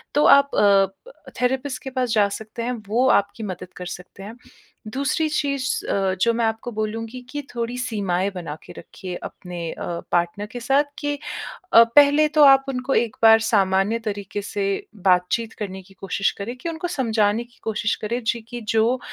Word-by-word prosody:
तो 295 Hz, -, +4 dB
आप 280 Hz, 0 st, +6 dB
अ, 200 Hz, -, +1 dB
थेरेपिस्ट 260 Hz, +1 st, -1 dB
के 265 Hz, -, -5 dB
पास 255 Hz, -1 st, -1 dB
जा 210 Hz, -2 st, +4 dB
सकते 220 Hz, +2 st, -7 dB
हैं 245 Hz, -, -1 dB, 0.2 s
वो 240 Hz, +5 st, +2 dB
आपकी 200 Hz, +2 st, +1 dB
मदद 185 Hz, -2 st, -7 dB
कर 180 Hz, -, -6 dB
सकते 180 Hz, +2 st, -14 dB
हैं। 215 Hz, +3 st, -8 dB, 0.5 s
दूसरी 275 Hz, +6 st, 0 dB
चीज़ 280 Hz, -3 st, -1 dB
अ, 195 Hz, -1 st, +1 dB
जो 235 Hz, -, +4 dB
मैं 230 Hz, 0 st, +1 dB
आपको 225 Hz, +2 st, -2 dB
बोलूँगी 225 Hz, +3 st, -4 dB
कि 290 Hz, +2 st, -4 dB
थोड़ी 235 Hz, +1 st, -3 dB
सीमाएँ 200 Hz, -7 st, -1 dB
बना 165 Hz, -5 st, -5 dB
के -, -, -12 dB
रखिए 185 Hz, -1 st, -8 dB
अपने 175 Hz, -2 st, -6 dB
अ, -, -, -6 dB, 0.3 s
पार्टनर 175 Hz, +4 st, 0 dB
के 245 Hz, -, -6 dB
साथ 270 Hz, +4 st, +3 dB, 0.2 s
कि 290 Hz, -1 st, -2 dB, 0.6 s
अ, 230 Hz, -, +10 dB
पहले 290 Hz, +1 st, +6 dB
तो 305 Hz, 0 st, +4 dB
आप 270 Hz, -1 st, +7 dB
उनको 260 Hz, 0 st, -2 dB
एक 230 Hz, -3 st, +1 dB
बार 225 Hz, 0 st, +8 dB
सामान्य 205 Hz, 0 st, +2 dB
तरीक़े 205 Hz, -1 st, -4 dB
से 200 Hz, 0 st, -3 dB, 0.4 s
बातचीत 185 Hz, +5 st, +2 dB
करने 190 Hz, -2 st, -5 dB
की 190 Hz, +1 st, -20 dB
कोशिश 195 Hz, 0 st, 0 dB
करें 220 Hz, +5 st, -5 dB
कि 295 Hz, +7 st, -5 dB
उनको 330 Hz, +1 st, -4 dB
समझाने 225 Hz, -8 st, +1 dB
की 240 Hz, 0 st, -24 dB
कोशिश 210 Hz, -1 st, -1 dB
करें। 235 Hz, +3 st, -3 dB
जी, 230 Hz, +1 st, -1 dB
कि 240 Hz, +2 st, -8 dB
जो 225 Hz, +4 st, +2 dB
225 Hz, 180 wpm, -22 LUFS, 200-255 Hz, 0.6 s, अ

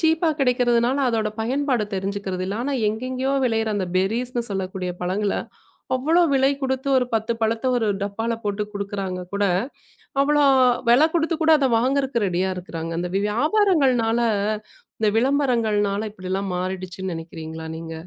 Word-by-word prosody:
சீப்பா 320 Hz, 0 st, +2 dB
கிடைக்கறதுனால 245 Hz, 0 st, +2 dB
அதோட 220 Hz, -2 st, 0 dB
பயன்பாடு 255 Hz, -1 st, 0 dB
தெரிஞ்சுக்கறது 195 Hz, -1 st, -3 dB
இல்லை. 200 Hz, +2 st, -3 dB
ஆனா 280 Hz, -, -2 dB, 0.2 s
எங்கேயோ 255 Hz, +5 st, -2 dB
விளையிற 225 Hz, -2 st, +1 dB
அந்தப் 185 Hz, -3 st, -3 dB
பெர்ரீஸ்ன்னு 235 Hz, +5 st, -1 dB
சொல்லக்கூடிய 185 Hz, -2 st, -3 dB
பழங்கள 195 Hz, +3 st, 0 dB, 0.6 s
அவ்வளவு 320 Hz, +6 st, +3 dB
விலை 270 Hz, 0 st, +4 dB
கொடுத்து 265 Hz, 0 st, -2 dB
ஒரு 250 Hz, -1 st, +2 dB
10 225 Hz, +1 st, 0 dB
பழத்தை 225 Hz, +3 st, 0 dB
ஒரு 230 Hz, -2 st, 0 dB, 0.2 s
டப்பால 225 Hz, +3 st, -2 dB
போட்டுக் 205 Hz, 0 st, -2 dB
குடுக்கிறாங்க 195 Hz, -2 st, -4 dB
கூட 200 Hz, 0 st, +1 dB, 0.8 s
அவ்வள 295 Hz, +1 st, +3 dB, 0.5 s
வெல 250 Hz, +5 st, +6 dB
கொடுத்து 330 Hz, 0 st, +1 dB
கூட 320 Hz, 0 st, +5 dB
அத 275 Hz, -, +2 dB
வாங்கறதுக்கு 260 Hz, -2 st, +1 dB
ரெடியா 185 Hz, +1 st, 0 dB
இருக்கிறாங்க. 165 Hz, -2 st, -5 dB
அந்த 180 Hz, +1 st, -2 dB, 0.2 s
வியாபாரங்கள்னால 265 Hz, -, +2 dB, 0.8 s
இந்த 215 Hz, -, +3 dB
விளம்பரங்கள்னால 225 Hz, -6 st, +1 dB
இப்டி 185 Hz, -3 st, -8 dB
எல்லாம் 195 Hz, -1 st, -2 dB
மாறிடுச்சுன்னு 185 Hz, 0 st, -4 dB
நெனைக்கிறீங்களா 160 Hz, 0 st, -7 dB
நீங்க? 165 Hz, 0 st, -7 dB
225 Hz, 135 wpm, -23 LUFS, 190-260 Hz, 0.8 s, வெல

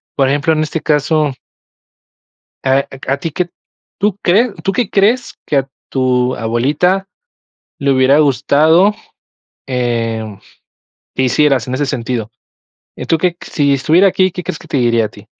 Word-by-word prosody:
por 135 Hz, -2 st, +2 dB
ejemplo, 145 Hz, +3 st, +1 dB
en 155 Hz, -, 0 dB
este 155 Hz, +1 st, -3 dB
caso 150 Hz, -1 st, +1 dB, 1.3 s
eh, 130 Hz, -, +1 dB, 0.2 s
a 135 Hz, -, -10 dB
q -, -, -12 dB
a -, -, +1 dB
ti 165 Hz, -, -4 dB
que 180 Hz, +3 st, -2 dB, 0.5 s
¿tú 205 Hz, -1 st, 0 dB
crees 210 Hz, +6 st, +3 dB
tú 195 Hz, -, 0 dB
que 240 Hz, -1 st, -1 dB
crees 220 Hz, +5 st, +1 dB
que 145 Hz, -, 0 dB
a 135 Hz, 0 st, -2 dB, 0.2 s
tu 130 Hz, -1 st, +1 dB
abuelita 145 Hz, -, 0 dB, 0.7 s
le 140 Hz, -1 st, +1 dB
hubiera 130 Hz, +2 st, +4 dB
gustado, 155 Hz, -, +3 dB, 0.7 s
eh, 115 Hz, -3 st, -1 dB, 0.9 s
que -, -, 0 dB
hicieras 135 Hz, -1 st, +2 dB
en 130 Hz, -, -2 dB
ese 145 Hz, +1 st, -1 dB
sentido? 120 Hz, -4 st, -3 dB, 0.7 s
Y -, -, -6 dB
tú 165 Hz, -, +2 dB
que 175 Hz, +1 st, 0 dB
si 140 Hz, -2 st, 0 dB
estuviera 160 Hz, +8 st, +4 dB
aquí, 185 Hz, -1 st, +2 dB
¿qué 180 Hz, -, -6 dB
crees 155 Hz, -, -5 dB
que -, -, -15 dB
te -, -, -1 dB
diría 115 Hz, -3 st, +2 dB
a -, -, -5 dB
ti? -, -, -16 dB
145 Hz, 165 wpm, -15 LUFS, 130-175 Hz, 1.3 s, hubiera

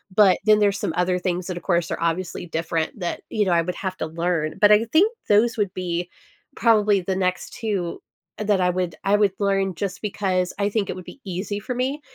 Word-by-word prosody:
But 205 Hz, -3 st, +6 dB
then 215 Hz, 0 st, +6 dB
there's 200 Hz, -1 st, +2 dB
some 160 Hz, -, -2 dB
other 180 Hz, 0 st, +1 dB
things 180 Hz, 0 st, -2 dB
that, 180 Hz, -2 st, -4 dB
of -, -, -6 dB
course, 170 Hz, -3 st, 0 dB
are -, -, -2 dB
obviously 170 Hz, +1 st, -2 dB
different 165 Hz, +3 st, -2 dB
that, 175 Hz, -1 st, -3 dB
you 210 Hz, -2 st, +1 dB
know, 185 Hz, -, +1 dB
I 170 Hz, -, +4 dB
would 180 Hz, +1 st, -4 dB
have 185 Hz, 0 st, -4 dB
to 160 Hz, -, -3 dB
learn. 165 Hz, -1 st, -1 dB
But 205 Hz, 0 st, +7 dB
I 210 Hz, +2 st, +5 dB
think 360 Hz, -, +3 dB, 0.2 s
those 225 Hz, +3 st, +4 dB
would 200 Hz, -3 st, 0 dB
be 175 Hz, -1 st, -3 dB, 0.5 s
probably 210 Hz, -4 st, +3 dB
the 185 Hz, +1 st, -2 dB
next 185 Hz, -1 st, -1 dB
2 195 Hz, -7 st, -3 dB, 0.4 s
that 205 Hz, -3 st, +1 dB
I 180 Hz, -, +3 dB
would 180 Hz, -3 st, -2 dB
I 200 Hz, +1 st, +3 dB
would 205 Hz, -3 st, +3 dB
learn 195 Hz, -2 st, +1 dB
just 195 Hz, +2 st, -4 dB
because 190 Hz, -3 st, -1 dB
I 200 Hz, 0 st, +2 dB
think 205 Hz, -2 st, -1 dB
it -, -, -3 dB
would 185 Hz, -, -9 dB
be 280 Hz, -, -12 dB
easy 195 Hz, +2 st, -3 dB
for 250 Hz, +4 st, -5 dB
me, 265 Hz, +4 st, -1 dB
190 Hz, 225 wpm, -23 LUFS, 175-210 Hz, 0.5 s, But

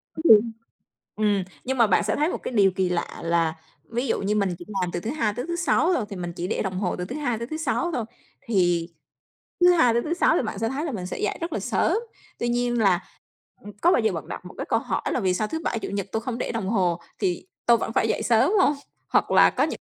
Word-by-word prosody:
Đúng 315 Hz, -, -5 dB
luôn. 225 Hz, +2 st, +1 dB, 0.6 s
Ừm, 205 Hz, -3 st, +1 dB, 0.2 s
nhưng 265 Hz, +1 st, -2 dB
mà 230 Hz, -2 st, +5 dB
bạn 190 Hz, -, +3 dB
sẽ 210 Hz, -, 0 dB
thấy 305 Hz, +3 st, +1 dB
một -, -, -2 dB
cái -, -, -4 dB
điều 195 Hz, -3 st, +4 dB
kỳ 185 Hz, -1 st, 0 dB
lạ 170 Hz, -1 st, 0 dB, 0.2 s
là 165 Hz, -1 st, +1 dB, 0.4 s
ví 240 Hz, +3 st, -2 dB
dụ -, -, 0 dB
như 205 Hz, +2 st, 0 dB
mình 195 Hz, -4 st, 0 dB
chỉ 175 Hz, -, -9 dB, 0.2 s
làm 180 Hz, -1 st, -1 dB
từ 175 Hz, -, -2 dB
thứ 220 Hz, -, -4 dB
Hai 225 Hz, -8 st, 0 dB
tới 245 Hz, +6 st, -4 dB
thứ 345 Hz, -, -2 dB
Sáu 345 Hz, 0 st, +2 dB
thôi, 235 Hz, -10 st, 0 dB
thì 200 Hz, -, -6 dB
mình 175 Hz, -1 st, -5 dB
chỉ 175 Hz, -, -3 dB
để -, -, -1 dB
đồng 190 Hz, -2 st, -2 dB
hồ 185 Hz, -3 st, -1 dB
từ 180 Hz, -, -4 dB
thứ 255 Hz, -, -6 dB
Hai 245 Hz, -7 st, -1 dB
tới 235 Hz, -, -5 dB
thứ 310 Hz, +3 st, -4 dB
Sáu 320 Hz, +3 st, -1 dB
thôi, 240 Hz, -7 st, -2 dB, 0.4 s
thì 175 Hz, -6 st, +1 dB, 0.7 s
thứ 355 Hz, 0 st, +7 dB
Hai 250 Hz, -9 st, +4 dB
tới 235 Hz, +1 st, +1 dB
thứ 330 Hz, -, -1 dB
Sáu 345 Hz, -, +3 dB
thì -, -, +2 dB
bạn 215 Hz, -3 st, -4 dB
sẽ 225 Hz, +1 st, 0 dB
thấy 285 Hz, +4 st, -3 dB
là 300 Hz, -, -3 dB
mình 180 Hz, -4 st, -4 dB
sẽ -, -, -5 dB
dậy 210 Hz, -, -1 dB
rất 335 Hz, 0 st, -4 dB
là -, -, -1 dB
sớm. -, -, +1 dB, 0.4 s
Tuy 240 Hz, -, -1 dB
nhiên 240 Hz, 0 st, 0 dB
là, 190 Hz, -3 st, +3 dB, 0.6 s
ừm, 210 Hz, -, -8 dB
có 350 Hz, -, +5 dB
bao -, -, +4 dB
giờ 220 Hz, -3 st, +1 dB
bạn 165 Hz, -, -6 dB
đặt -, -, -7 dB
một 180 Hz, -, -11 dB
cái -, -, -4 dB
câu 225 Hz, -, +3 dB
hỏi -, -, -2 dB
là 250 Hz, -, 0 dB
"Vì 185 Hz, -2 st, +1 dB
sao 215 Hz, +3 st, 0 dB
thứ 320 Hz, -, -3 dB
Bảy, 230 Hz, -, -1 dB
Chủ -, -, -5 dB
nhật 200 Hz, -1 st, -3 dB
tôi 220 Hz, -, -1 dB
không 245 Hz, -1 st, -4 dB
để -, -, -3 dB
đồng 200 Hz, -4 st, -3 dB
hồ, 180 Hz, -5 st, +1 dB, 0.2 s
thì 180 Hz, -, -1 dB, 0.2 s
tôi 235 Hz, -1 st, +6 dB
vẫn 225 Hz, -, -3 dB
phải 225 Hz, -, +2 dB
dậy -, -, 0 dB
sớm 225 Hz, +6 st, +3 dB
hông?" 295 Hz, -, +4 dB, 0.3 s
Hoặc -, -, +2 dB
là -, -, +6 dB
có -, -, +1 dB
những -, -, -4 dB
220 Hz, 280 wpm, -25 LUFS, 185-250 Hz, 0.7 s, thứ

